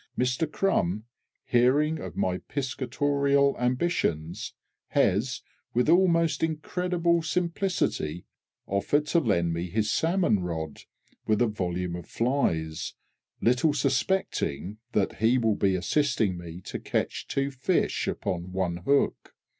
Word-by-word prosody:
Mister 125 +5 +1
CRUM, 110 - 0 0.4
hearing 145 +6 +3
of - - -7
my 90 0 0
piscatorial 140 +1 +1
ambitions, 125 - -1 0.3
has, - - +1 0.3
with 125 +4 +3
almost 170 -2 +4
incredible 170 +2 0
simplicity, 170 - -1 0.4
offered 100 +10 +1
to 170 +3 +3
lend 85 - +1
me 85 +2 -3
his 105 +3 0
salmon 165 - +2
rod, 80 -4 -4 0.5
with 110 -1 +3
a 120 - +4
volume 90 -4 -2
of 90 - -8
flies, 85 - -1 0.5
little 130 +6 +3
suspecting 130 - 0
that 100 -2 0
he 115 +3 +3
will 115 -3 +2
be 95 -2 +2
assisting 110 0 +1
me 85 0 -8
to - - -6
catch - - -2
two 140 0 -1
fish 140 +7 0
upon 90 0 -3
one 90 -2 -1
hook! 140 +11 0
125 Hz, 120 wpm, -27 LUFS, 90-150 Hz, 0.5 s, almost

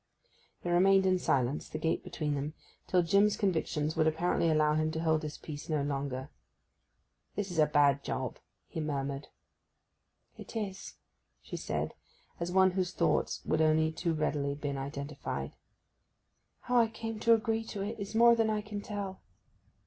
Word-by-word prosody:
They 175 - -1
remained 190 +2 +5
in 185 -1 +3
silence, 135 -3 0
the - - -4
gate 160 +1 0
between 150 -2 -2
them, 145 +2 -3 0.3
till 180 -1 +3
Jim's 200 +4 +3
convictions 160 -5 0
would 155 - +3
apparently 165 +1 +1
allow 155 -1 +3
him 155 +1 +1
to 160 - -2
hold 160 -1 +2
his 150 -1 -5
peace 150 0 -8
no 150 -3 +1
longer. 140 -1 -3 1.1
'This 200 -2 -2
is 170 - -2
a 155 - +6
bad 145 -2 +3
job!' 130 -2 -3 0.3
he - - -6
murmured. 140 -2 -3 1.1
'It - - -10
is,' 200 -3 -4 0.5
she - - -7
said, - - -2 0.5
as 170 +1 -2
one 190 0 +5
whose 185 -1 -1
thoughts - - +1
have 155 0 +2
only 160 0 +3
too 165 0 -1
readily 145 -2 0
been 145 -1 -3
identified. 140 +1 -4 1.1
'How 250 0 +1
I 230 -1 +6
came 225 0 -6
to 230 +1 +6
agree 225 0 -1
to 200 -3 -4
it 210 +2 -4
is 200 +2 -5
more 235 +1 +7
than 225 -1 +2
I 215 -1 0
can 210 -1 -6
tell! 200 -2 -5
160 Hz, 165 wpm, -31 LUFS, 150-200 Hz, 1.1 s, more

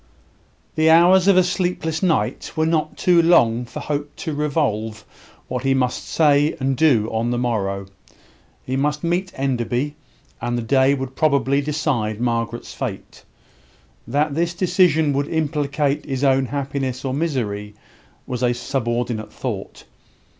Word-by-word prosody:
The 160 0 +3
hours 175 +3 +6
of 195 -2 +6
a 185 - +6
sleepless 175 -3 -1
night 180 -4 0
were 160 -1 +1
not 160 -1 0
too 175 -2 +4
long 125 -8 +4
for 115 - -8
Hope 145 0 -4
to 160 -5 -4
revolve 110 -8 -1 0.4
what 125 - -3
he 135 0 +2
must 125 -1 -1
say 150 -1 +3
and 135 0 0
do 125 -7 +3
on 115 +1 -1
the 120 - -1
morrow. 100 -5 -1 0.8
He 130 - -3
must 150 +3 -1
meet 180 +2 -1
Enderby; 130 +1 -1 0.5
and 120 +1 -1
the 120 - -2
day 135 +3 +3
would 130 -1 -6
probably 140 -2 +2
decide 140 -8 -1
Margaret's 115 -2 -2
fate. - - -6 0.8
That 145 +4 0
this 170 +3 -1
decision 165 -5 +3
would 140 +1 0
implicate 150 -2 -1
his 135 -1 -4
own 135 -1 +3
happiness 135 0 -3
or 130 - -1
misery 110 -9 -2 0.5
was 125 -1 -4
a 120 -1 +2
subordinate 120 -3 -2
thought. - - -6
140 Hz, 145 wpm, -21 LUFS, 120-155 Hz, 0.8 s, hours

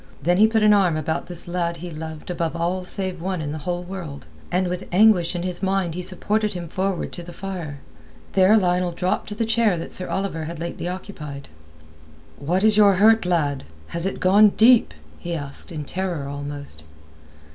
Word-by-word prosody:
Then 175 +4 +3
he 215 +2 +7
put 220 -1 +1
an 210 0 +7
arm 185 -6 +3
about 160 +1 -2
this 175 -1 -4
lad 170 -1 -2
he 175 +1 -7
loved 160 +1 -7
above 170 -2 -2
all 175 +2 -1
save 185 -1 -2
one 185 0 -2
in 150 -2 -3
the 155 - -4
whole 175 0 -2
world, 175 - -7 0.3
and 180 +1 +1
with 180 +1 -4
anguish 185 -3 +4
in 175 - -2
his 180 -1 -3
mind 190 -3 0
he 180 - -4
supported 210 +4 -1
him 175 -2 -5
forward 190 0 -2
to 175 - -7
the 175 0 -10
fire. 175 -7 -6 0.6
There 195 +3 +6
Lionel 180 -2 +1
dropped 180 +4 -1
to 210 - -5
the 230 +1 0
chair 225 -4 +2
that 165 - -6
Sir 185 - -2
Oliver 190 -5 -2
had 170 +1 -6
lately 170 +1 -5
occupied. 155 -7 -7 0.9
"What 180 +7 0
is 215 -1 +5
your 200 -2 +6
hurt, 220 0 +5
lad? 145 -6 0 0.3
Has 170 +2 -1
it 195 - -4
gone 205 +3 +6
deep?" 230 - +5 0.2
he 170 0 -4
asked, 145 +3 -4
in 150 -3 -5
terror 175 -4 -3
almost. 145 - -6
180 Hz, 195 wpm, -23 LUFS, 165-195 Hz, 0.9 s, he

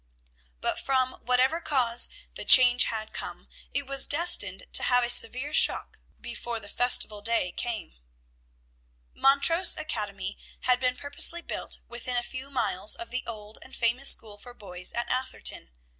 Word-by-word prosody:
But - - -2
from 260 -1 0
whatever 255 +7 +1
cause 245 -6 +2 0.2
the - - -8
change 250 -1 +6
had 220 -1 -5
come, - - -9 0.2
it 280 0 -2
was 275 0 +4
destined 340 +10 +3
to - - +6
have 245 -1 +2
a 240 - +4
severe 255 +6 +3
shock - - +1 0.2
before 235 0 -6
the 205 - -14
festival 215 -2 +2
day 225 -4 0
came. 230 - -6 1.2
Montrose 330 +6 +3
Academy 205 -9 -5 0.2
had 250 -1 +1
been 250 -1 -1
purposely 290 +4 +1
built - - -5
within 245 +1 -4
a 240 - -1
few 260 +2 -7
miles 215 -6 +1
of 350 0 -9
the 255 +1 -3
old 215 -2 -9
and 260 - -12
famous 240 +4 +3
school 210 -2 -1
for 245 +3 -14
boys 180 -4 -5
in 235 - -2
Atherton. 255 - -4
245 Hz, 155 wpm, -26 LUFS, 225-270 Hz, 1.2 s, change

